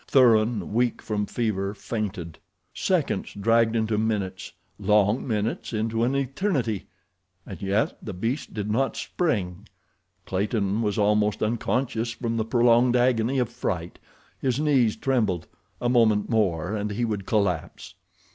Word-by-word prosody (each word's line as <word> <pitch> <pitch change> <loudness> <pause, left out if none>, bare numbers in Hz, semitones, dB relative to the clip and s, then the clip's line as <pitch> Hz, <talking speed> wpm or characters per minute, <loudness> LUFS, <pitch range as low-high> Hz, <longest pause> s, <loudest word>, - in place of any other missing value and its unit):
Thuran, 110 -6 +3
weak 120 +1 +1
from 105 -1 -2
fever, 100 -4 -2
fainted. 100 -6 -5 0.3
Seconds - - -1
dragged 115 +2 +3
into 110 -1 +1
minutes, 100 -4 -2 0.3
long 105 +4 +2
minutes 110 +1 -2
into 115 +1 0
an 130 +3 +1
eternity, 135 - -1 0.6
and 95 - -9
yet 100 +3 0
the 105 - -5
beast 115 +10 -3
did 105 -1 -3
not 135 +5 0
spring. 100 - -2 0.6
Clayton 100 +2 0
was 105 -3 -1
almost 105 0 +2
unconscious 115 +1 -1
from 115 -1 -3
the 110 - 0
prolonged 120 +1 +4
agony 125 +1 +2
of 125 -3 +1
fright—his 110 - -4
knees 135 -8 +3
trembled—a 115 -3 -2
moment 110 -4 +3
more 95 -4 +1
and 105 0 -2
he 115 +4 -1
would 105 -4 -3
collapse. 90 -3 -1
110 Hz, 130 wpm, -25 LUFS, 100-120 Hz, 0.6 s, prolonged